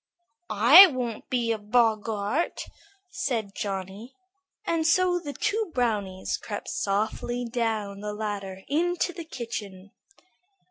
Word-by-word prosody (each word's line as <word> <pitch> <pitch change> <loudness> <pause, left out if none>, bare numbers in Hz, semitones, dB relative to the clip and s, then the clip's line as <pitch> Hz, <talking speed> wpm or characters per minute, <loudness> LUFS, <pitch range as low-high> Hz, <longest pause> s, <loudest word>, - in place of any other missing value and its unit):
"I 245 - +9
won't 250 -7 -4
be 240 -2 0
a 225 - -1
boggart," 220 +4 0 0.5
said 235 - -2
Johnny, 200 +3 -5 0.5
and 325 -1 0
so 360 +1 +3
the 300 -4 -6
two 430 +8 -1
brownies 205 -6 -1
crept - - -6
softly 240 0 -2
down 225 -4 -2
the 210 0 -4
ladder 200 -3 -5
into 350 +4 0
the 335 -2 -8
kitchen. 205 -8 -7
230 Hz, 110 wpm, -26 LUFS, 205-285 Hz, 0.5 s, I